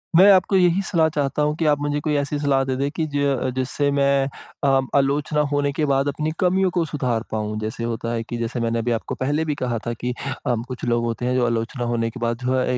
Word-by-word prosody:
मैं 190 +4 +8
आपको 190 +1 +4
यही 180 +1 +4
सलाह 165 -4 +3
चाहता 145 -1 -1
हूँ 150 +1 +1
कि 165 - 0
आप 145 -1 +3
मुझे 145 0 0
कोई 150 +1 -1
ऐसी 140 +1 -1
सलाह 140 -2 +2
दें 130 -1 -2
दें 140 +1 0
कि 160 - +2
ज 140 -2 +1
जिससे 130 +2 0
मैं 140 -1 +2 0.4
अ, 135 -1 +4 0.2
आलोचना 145 +2 +2
होने 145 0 +1
के 150 +1 -1
बाद 140 0 +1
अपनी 150 +2 -1
कमियों 185 +1 +3
को 175 -1 +1
सुधार 125 -6 -1
पाऊँ। 105 -1 -2
जैसे 110 +2 -4
होता 115 0 -3
है 115 -1 -2
कि 120 +1 -5
जैसे 115 +1 -3
मैंने 115 0 0
अभी 120 +1 -1
आपको 115 - -2
पहले 145 +4 0
भी 150 -2 -1
कहा 125 -3 -2
था 120 - -1
कि 125 +2 -3 0.3
अ, 120 - +2
कुछ 125 -2 -7
लोग 120 -1 +1
होते 115 +1 -3
हैं 125 +1 +1
जो 125 - +2
आलोचना 115 +2 -2
होने 115 -1 0
के 120 +3 -9
बाद 115 -1 -1
जो 125 - +1
है 125 -1 +1
135 Hz, 250 wpm, -22 LUFS, 120-150 Hz, 0.4 s, मैं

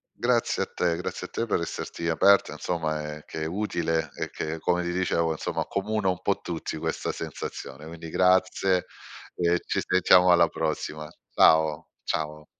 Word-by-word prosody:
Grazie - - +1
a - - -14
te, 85 -2 0
grazie 90 +1 -5
a - - -24
te 115 - -2
per 105 - 0
esserti 85 0 -5
aperta, 100 +5 +4
insomma, 80 -3 -2
ehm, 75 - -11
che 80 - -6
è - - -2
utile, 80 -4 -1
e - - -4
che, 80 +1 -4
come 90 +2 +1
ti 85 0 -2
dicevo, 85 -2 +1
insomma, 80 - -2
accomuna 105 0 -1
un 90 - -3
po' - - 0
tutti 80 -2 -4
questa - - -2
sensazione. 70 +3 -7
Quindi 80 0 -8
grazie 95 0 +3 0.5
e 85 0 +2
ci - - 0
sentiamo 90 0 +5
alla 85 -1 +6
prossima. 75 -1 -3 0.3
Ciao, 80 0 +4 0.2
ciao 75 0 -3
85 Hz, 165 wpm, -26 LUFS, 80-90 Hz, 0.5 s, alla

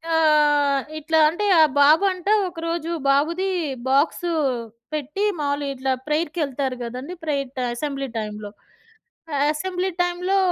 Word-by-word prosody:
ఆహ్, 295 -3 +3 0.2
ఇట్లా 320 +1 +1
అంటే 350 +6 -3 0.2
ఆ - - +9 0.2
బాబు 305 +6 +6
అంట 365 0 -11 0.2
ఒకరోజు 335 -1 -4 0.2
బాబుది 335 +7 +2 0.4
బాక్స్ 290 +5 +2 0.7
పెట్టి 300 +7 -3 0.2
మామూలుగా 285 0 -1
ఇట్లా 265 +1 -1 0.2
ప్రేయర్‌కి 310 +2 -1
ఎళ్తారు 265 -1 -3
గదండీ, 255 +8 -6
ప్రేయర్ 275 -4 -2
అసెంబ్లీ 275 0 -3
టైమ్‌లో. 210 -1 -6 0.8
ఆహ్, 280 - +2
అసెంబ్లీ 370 +3 -2
టైమ్‌లో 360 +2 0
300 Hz, 120 wpm, -22 LUFS, 275-335 Hz, 0.8 s, ఆ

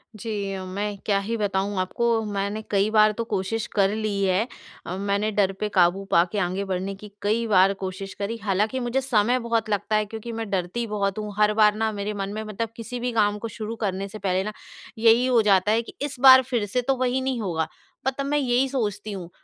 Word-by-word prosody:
जी, 200 -2 -4
मैं 200 +2 -3
क्या 200 -2 +2
ही 215 +4 -3
बताऊँ 200 -1 -1
आपको 230 +5 +1
मैंने 205 +1 -2
कई 200 +1 +2
बार 215 -1 +5
तो 230 +2 -3
कोशिश 215 +1 -2
कर 195 -2 +4
ली 210 -2 -1
है। 195 +4 +2 0.4
अ, 180 - -4
मैंने 200 +2 0
डर 200 -2 +2
पे 210 - -1
काबू 185 0 +3
पाके 180 +5 +3
आगे 185 +1 -1
बढ़ने 190 +1 -3
की 205 +1 -12
कई 220 +3 +1
बार 195 -2 +5
कोशिश 190 +1 -5
करी, 210 +3 -2
हालाँकि 210 +5 0
मुझे 245 +2 0
समय 245 -1 +2
बहुत 230 -2 -1
लगता 210 +1 0
है 215 0 +2
क्योंकि 220 +2 -7
मैं 225 -2 -4
डरती 190 +5 -2
बहुत 200 -1 -1
हूँ। 210 -1 -5
हर 210 0 +4
बार 210 -1 +4
ना 220 0 0
मेरे 205 0 -3
मन 195 -1 -3
में 215 +1 -4
मतलब 215 +1 -4
किसी 240 +1 -6
भी 245 +1 -2
काम 210 -2 +2
को 230 - -4
शुरू 220 0 -4
करने 195 0 -2
से 215 +2 -9
पहले 190 -1 0
ना 215 +2 -4 0.4
यही 230 +2 +5
हो 245 -3 +4
जाता 205 -1 +3
है 225 +1 +3
कि 235 - -11
इस 285 -1 -3
बार 260 0 +9
फ़िर 240 -4 -1
से 230 +5 -1
तो 270 +2 +1
वही 255 +1 0
नहीं 260 -2 -1
होगा? 165 -5 -1 0.4
पर 265 - +3
तब 275 - -2
मैं 290 +1 +1
यही 260 -1 +2
सोचती 215 -5 -2
हूँ 185 -4 -6
210 Hz, 225 wpm, -24 LUFS, 195-230 Hz, 0.4 s, बार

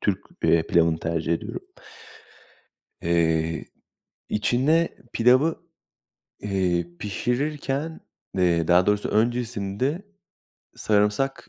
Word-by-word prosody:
Türk, 100 -3 0 0.2
eee, 85 -1 +4
pilavını 80 -1 +3
tercih 85 0 -1
ediyorum. 85 - -4 1.4
Eee, 80 -1 +1 0.6
içine 135 +10 +2 0.2
pilavı, 130 +7 +4 0.8
eee, 90 -4 0
pişirirken 140 - -2 0.4
eee, 85 -3 +2
daha 90 +1 +5
doğrusu 105 0 +1
öncesinde 120 - -1 0.7
sarımsak 105 +6 0
105 Hz, 80 wpm, -24 LUFS, 85-130 Hz, 1.4 s, daha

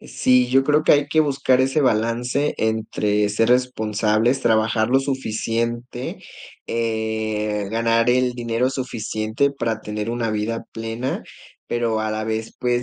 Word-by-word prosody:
Eh, - - -14
sí, 125 -1 +3
yo 135 +1 +3
creo 150 +2 +3
que - - +5
hay 145 0 +3
que 155 +1 +3
buscar 135 -3 +2
ese 135 +3 +2
balance 125 +3 +1
entre 105 -2 0
ser 110 +3 +1
responsables, 115 -1 +1
trabajar 110 -1 +2
lo 130 +2 +4
suficiente, 120 -1 -3 0.5
eh, 110 -2 -2
ganar 115 +1 +2
el 125 0 +2
dinero 120 +1 -1
suficiente 115 0 -1
para 115 -5 -2
tener 105 +1 -4
una 120 -2 -1
vida 110 +2 -2
plena, 115 +3 -4 0.4
pero 115 -2 0
a 110 0 -1
la 110 0 -2
vez, 110 0 -3
pues, 120 0 0
115 Hz, 145 wpm, -22 LUFS, 110-125 Hz, 0.5 s, que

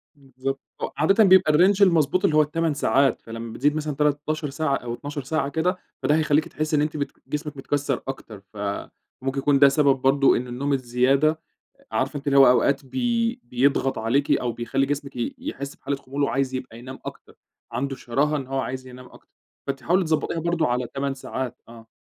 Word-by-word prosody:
بالضبط، 135 0 -5 0.2
و - - +1
عادةً 195 +9 +4
بيبقى 185 -5 +6
الrange 190 +5 +4
المضبوط 170 -1 +4
اللي 155 - +2
هو - - +7
ال8 160 +1 0
ساعات، 135 -2 +2
فلمّا 115 0 -7
بتزيد 145 +5 +1
مثلًا 150 -2 -3
13 150 +1 0
ساعة 140 0 0
أو 120 -2 -5
12 145 +3 -6
ساعة 140 +1 -1
كده، 180 +5 0 0.3
فده 150 - +3
هيخلّيكِ 155 -1 +2
تحسي 155 0 -2
إن 145 - +3
أنتِ 150 0 -1
بت 140 - -2 0.2
جسمِك 150 -1 -4
متكَسر 145 +1 -2
أكتر، 110 -6 -7
فممكن 110 +6 -5
يكون 140 0 +3
ده 140 - +8
سبب 140 -1 +3
برضه 135 +1 +4
إن 125 - -4
النوم 140 +4 -2
الزيادة 135 +5 +2 0.5
عارفة 135 +2 -1
أنتِ 145 +1 -9
اللي 140 0 +3
هو 135 - +9
أوقات 135 +2 +2
بي 235 - -1
بيضغط 135 +1 +1
عليكِ 125 +6 +1
أو 120 - +1
بيخلّي 125 +4 -1
جسمِك 140 0 -4
ي 120 -1 -3
يحس 140 +1 -6
بحالة 140 - -3
خمول 140 +1 -4
وعايز 135 -1 0
يبقى 125 -3 -6
ينام 130 +2 -9
أكتر، - - -9 0.4
عنده 135 +1 -2
شراهة 145 +6 0
إن 135 - -6
هو 135 0 -2
عايز 130 0 -4
ينام 125 0 -11
أكتر، - - -18 0.4
فأنتِ 135 -2 -3
حاولي 180 +7 +2
تضَبطيها 160 +1 0
برضه 170 0 0
على 125 0 -1
8 140 0 -2
ساعات 130 -2 -5
آه. 115 -1 -14
140 Hz, 190 wpm, -24 LUFS, 130-150 Hz, 0.5 s, هو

